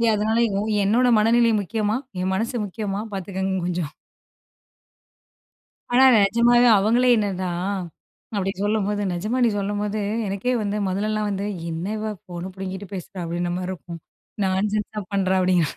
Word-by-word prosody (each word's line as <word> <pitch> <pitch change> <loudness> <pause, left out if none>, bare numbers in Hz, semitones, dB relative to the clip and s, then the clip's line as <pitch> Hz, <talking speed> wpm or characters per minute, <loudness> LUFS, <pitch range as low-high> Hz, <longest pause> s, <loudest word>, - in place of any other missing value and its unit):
அதனால 220 +2 +1 0.2
யோ 200 - 0 0.2
என்னோட 235 +5 +3
மனநிலை 230 +2 +4
முக்கியமா? 210 +2 -1 0.2
என் 185 +1 0
மனசு 230 +5 -1
முக்கியமா? 200 0 -4
பார்த்துக்கோங்க 190 0 -2
கொஞ்சம், 175 -4 -2 2.0
ஆனா 260 +2 +7 0.2
நிஜமாவே 240 +4 +4
அவங்களே 235 +5 +3
என்னனா 190 -3 -1 0.9
அப்படி 195 -1 0
சொல்லும்போது 205 -1 0
நிஜமா 210 +8 -2
"நீ - - +4
சொல்லும்போது 205 +1 -2 0.3
எனக்கே 200 +6 -1
வந்து 205 0 -1
மொதல்லலாம் 210 +2 -1
வந்து 200 0 -2 0.2
என்ன 165 +2 -4
இவா 215 0 -3
ஃபோனை 175 +1 -6
புடுங்கிட்டு 190 +1 -6
பேசுறா, 185 +1 -7
அப்படின்ற 175 +1 -2
மாரி 185 0 -3
இருக்கும் 170 -2 -7 0.5
நான்சென்ஸா 210 +2 -1
பண்ணுறா" 190 -1 +2
அப்படிங்கிற, 180 -4 +2
200 Hz, 130 wpm, -23 LUFS, 185-215 Hz, 2.0 s, ஆனா